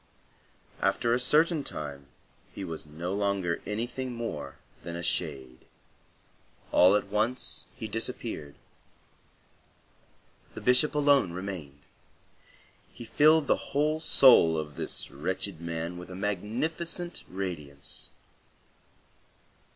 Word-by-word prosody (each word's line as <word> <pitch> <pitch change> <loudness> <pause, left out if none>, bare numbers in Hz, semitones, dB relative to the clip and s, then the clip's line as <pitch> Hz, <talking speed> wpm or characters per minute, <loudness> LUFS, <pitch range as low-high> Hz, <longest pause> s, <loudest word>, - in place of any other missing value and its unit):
After 120 0 +2
a 120 - +2
certain 155 +4 +3
time 70 - -6 0.4
he 100 - -7
was 80 -3 -6
no 85 +5 -4
longer 100 -4 0
anything 120 +4 -3
more 75 -13 -5 0.3
than 85 - -6
a 85 - -5
shade. 65 -8 -2 1.1
All 90 +3 +6
at 100 -1 0
once 110 +5 0
he 115 -4 -5
disappeared. 110 - -4 2.0
The - - -7
Bishop 125 +5 +3
alone 140 -10 +4
remained; 90 -7 -6 1.1
he 120 - -10
filled 155 +6 +5
the - - +3 0.2
whole 155 +2 +2
soul 125 - +6
of 75 -1 -5
this - - -5
wretched 95 +5 -2
man 85 +1 -4
with 90 - -10
a 90 - -7
magnificent 130 - -2
radiance. 80 -6 -3
100 Hz, 105 wpm, -29 LUFS, 80-125 Hz, 2.0 s, All